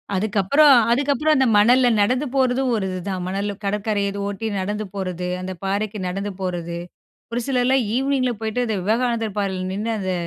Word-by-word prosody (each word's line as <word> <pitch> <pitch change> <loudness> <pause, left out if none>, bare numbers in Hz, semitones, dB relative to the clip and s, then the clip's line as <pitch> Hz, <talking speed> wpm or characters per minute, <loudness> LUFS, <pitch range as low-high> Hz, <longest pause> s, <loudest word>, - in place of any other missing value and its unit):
அதுக்கப்புறம் 215 +9 +4 0.2
அதுக்கப்புறம் 285 +4 +2
அந்த 265 - +3
மணல்ல 245 +4 +5
நடந்து 250 +7 +1
போறதும் 260 -1 +2
ஒரு 205 -3 -1
இதுதான், 185 0 -4
மணல்ல 200 +2 -2
கடற்கரை 205 0 -1
அது 200 - -6
ஒட்டி 205 +2 -4
நடந்து 210 +3 -3
போறது, 180 -2 -3
அந்த 185 0 -5
பாறைக்கு 205 +2 -2
நடந்து 195 +3 -3
போறது, 170 -2 -3 0.5
ஒரு 235 - -1
சிலர்லாம் 260 0 +2
ஈவினிங்கில 265 -1 +1
போய்ட்டு 220 +3 -1
அந்த 220 - -1
விவேகானந்தர் 225 0 0
பாறையில 190 -2 -2
நின்னு 215 +3 -2
அந்த 185 -1 -2
210 Hz, 160 wpm, -22 LUFS, 195-250 Hz, 0.5 s, மணல்ல